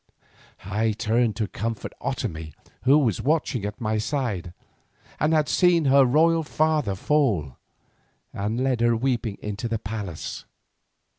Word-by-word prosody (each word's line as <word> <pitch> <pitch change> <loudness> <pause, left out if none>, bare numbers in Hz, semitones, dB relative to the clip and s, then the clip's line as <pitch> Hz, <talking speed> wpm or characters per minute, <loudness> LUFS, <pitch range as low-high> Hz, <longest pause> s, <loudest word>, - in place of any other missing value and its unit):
I 105 +3 0
turned 115 +1 +1
to 110 -2 -1
comfort 115 +3 -4
Otomie, 80 - -4 0.3
who 135 +3 +6
was 120 -10 +1
watching 145 -6 0
at 105 0 -5
my 110 -1 -1
side, 110 - -2 0.7
and 150 +2 +2
had 155 -2 +3
seen 175 -3 +3
her 135 0 +6
royal 165 +5 +4
father 155 -8 0
fall, 100 - 0 0.8
and 105 +4 -2
led 130 -3 0
her 120 0 +3
weeping 120 -4 -1
into 105 +3 -3
the 115 -1 -1
palace. 100 -6 -6
115 Hz, 135 wpm, -25 LUFS, 105-140 Hz, 0.8 s, who